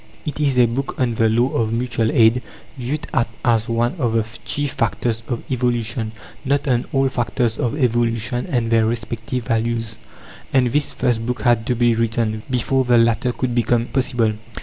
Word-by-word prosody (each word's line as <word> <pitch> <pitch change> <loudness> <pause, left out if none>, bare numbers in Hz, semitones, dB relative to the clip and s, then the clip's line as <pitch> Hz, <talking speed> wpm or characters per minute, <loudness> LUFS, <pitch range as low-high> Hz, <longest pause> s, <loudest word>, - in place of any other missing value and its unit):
It 150 -1 -4
is 140 -4 +1
a 125 - +6
book 125 +4 -3
on 125 -2 +1
the 110 0 +2
law 120 +4 +2
of 110 -1 0
Mutual 115 -1 0
Aid, 115 +1 +4 0.3
viewed 140 +4 -3
at 120 - +2 0.2
as 115 -1 +2
one 115 +3 +1
of 120 -5 0
the 115 -1 +1 0.2
chief 145 +5 -1
factors 115 -2 -1
of 120 -3 -3
evolution 120 -3 -1 0.3
not 140 +2 0
on 125 -2 +1
all 135 0 +2
factors 120 -2 -1
of 120 +4 -1
evolution 120 -1 0
and 115 -3 -1
their 115 -1 +4
respective 115 +1 -3
values; 115 -1 -1 0.5
and 125 -3 +3
this 145 +2 +1
first 115 -2 0
book 125 0 -3
had 120 -3 +2
to 125 - +1
be 120 0 +3
written, 115 -1 0
before 130 +1 +1
the 120 -1 +3
latter 115 +2 +2
could 125 0 -2
become 120 0 +2
possible. 120 -4 +1
120 Hz, 180 wpm, -20 LUFS, 115-125 Hz, 0.5 s, a